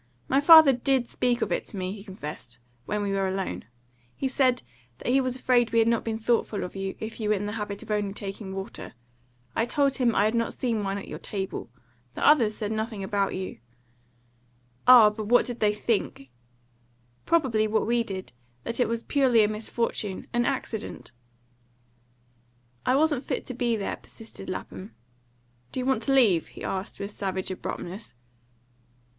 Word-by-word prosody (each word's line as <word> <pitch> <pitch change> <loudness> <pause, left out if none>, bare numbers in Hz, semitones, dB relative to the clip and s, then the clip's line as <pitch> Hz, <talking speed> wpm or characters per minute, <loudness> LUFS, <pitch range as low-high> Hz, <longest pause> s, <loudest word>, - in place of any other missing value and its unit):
My 275 - +3
father 315 -2 +9
DID 255 0 +1
speak 245 0 0
of - - -3
it - - -1
to 205 - -9
me," 185 0 -2
he 200 0 -8
confessed, 150 - -8 0.3
"when 210 0 -1
we 200 - -1
were 195 -1 +1
alone. 190 - -3 0.5
He 270 - -1
said 255 -2 +2 0.3
that 240 - -2
he 270 +1 +4
was 255 -1 -1
afraid 245 -2 +2
we 230 - +1
had 225 0 +5
not 230 -1 +2
been 225 -1 -2
thoughtful 225 -2 0
of 180 - -7
you, 195 0 -4
if 220 +1 -6
you 215 -1 -1
were 215 - +4
in 205 +1 -3
the 205 - -3
habit 210 -2 -5
of 205 -2 -1
taking 195 0 -6
only 190 0 -6
water; 195 +4 -7 0.6
I 225 - +2
told 275 +1 +1
him 245 -4 +2
I 205 - +4
had 215 - +1
not 230 -1 0
seen 230 -4 -1
wine 195 0 -2
at 200 - -7
your - - -7
table. 190 - -5 0.5
The - - -1
others 235 -8 +5
said 210 -1 -3
nothing 220 -2 -3
about 195 0 0
you." 185 -10 -5 1.3
"Ah, 240 -4 +9
but 210 0 -6
what 245 +2 +5
did 245 -1 -6
they 210 -1 +3
think?" 210 - -2 1.0
"Probably 255 -10 +2
what 215 +1 +1
we 235 +1 +2
did: 190 - -6 0.3
that 230 - -5
it 245 - +3
was 230 0 -2
purely 255 -6 +4
a - - +3
misfortune 215 -2 -3
an 240 0 +2
accident." 240 - -4 1.8
"I 255 - +4
wasn't 295 -2 +2
fit - - -3
to 255 - -5
be 240 -2 0
there," 200 -3 -3
persisted 220 -4 -11
Lapham. 185 +2 -7 0.8
"Do - - -3
you 250 - -2
want 265 -4 +1
to 235 - -1
leave?" 220 -12 +4
he - - -11
asked, 190 +1 -4
with 200 +1 -5
savage 190 -2 -3
abruptness. 185 - -6
220 Hz, 185 wpm, -26 LUFS, 200-245 Hz, 1.8 s, father